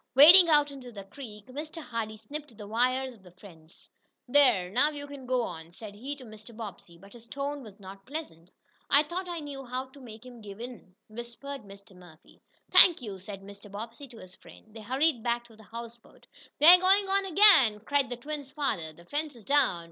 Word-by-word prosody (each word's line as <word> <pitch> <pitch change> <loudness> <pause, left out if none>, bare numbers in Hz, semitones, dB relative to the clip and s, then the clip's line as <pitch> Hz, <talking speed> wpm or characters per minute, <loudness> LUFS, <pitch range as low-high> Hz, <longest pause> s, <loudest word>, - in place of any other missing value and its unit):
Wading 335 +6 +9
out 295 -2 +4
into 260 -3 -10
the 200 -3 -9
creek 210 -1 -11
Mr. 305 +5 -8
Hardee 230 -7 -5
snipped 285 +2 -9
the 210 - -9
wires 255 +4 0
of 220 - -20
the 185 - -16
fence. 175 -3 -17 0.4
"There, 245 -9 +4
now 260 +8 +3
you 290 -1 -7
can 280 -3 -10
go 255 -1 +1
on," 165 -6 -6
he - - -22
said 210 +1 -10
to 265 +6 -7
Mr. 215 +1 -13
Bobbsey, 200 -6 -9
but 195 +3 -16
his 235 -1 -15
tone 280 +3 -4
was 215 -4 -13
not 195 +1 -12
pleasant. 260 - -8 0.4
"I 285 +2 +5
thought 360 +4 -5
I 340 -2 -4
knew 280 -2 -7
how 255 +1 -4
to 275 +1 -16
make 225 -1 -12
him 245 -2 -12
give 200 -1 -10
in," 235 -6 -10
whispered 240 +5 -8
Mr. 200 0 -15
Murphy. 175 -3 -18 0.3
"Thank 340 -7 +6
you," 200 -4 -7
said 195 +1 -9
Mr. 200 +1 -13
Bobbsey 230 +7 -8
to 240 -3 -15
his 185 -3 -12
friend. 215 +2 -17
They 220 - -10
hurried 260 +3 +1
back 240 +1 -1
to 225 - -17
the 220 - -17
houseboat. 235 +1 -11 0.3
"We're 345 +5 +9
going 390 +2 +3
on 395 0 +1
again!" 325 - +6
cried 280 +4 0
the 245 - -5
twins' 285 +1 -7
father. 270 - -3
"The 170 +2 -18
fence 295 - -3
is 230 - -15
down." 275 -11 +3
240 Hz, 210 wpm, -28 LUFS, 205-285 Hz, 0.4 s, Wading